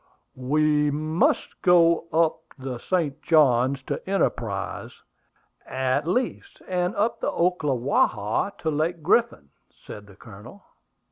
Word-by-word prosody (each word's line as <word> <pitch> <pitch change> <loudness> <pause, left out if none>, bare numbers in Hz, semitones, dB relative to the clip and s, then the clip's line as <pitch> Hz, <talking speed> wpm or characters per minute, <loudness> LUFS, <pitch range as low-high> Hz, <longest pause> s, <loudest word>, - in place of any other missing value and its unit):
"We 150 +3 +1
must 155 +3 -1
go 170 -2 +4
up 160 0 +2 0.2
the 130 -2 -6
St. 155 -3 -2
Johns 135 -4 +3
to - - -5
Enterprise, 195 0 -2 0.7
at 130 +3 -1
least, 245 +8 -2
and 180 0 -1
up 215 +3 0
the - - -1
Ocklawaha 140 - 0
to 160 - -2
Lake 155 +2 -2
Griffin," 150 - +1 0.2
said 105 -1 -12
the 100 - -16
Colonel. 110 - -14
150 Hz, 115 wpm, -24 LUFS, 130-170 Hz, 0.7 s, go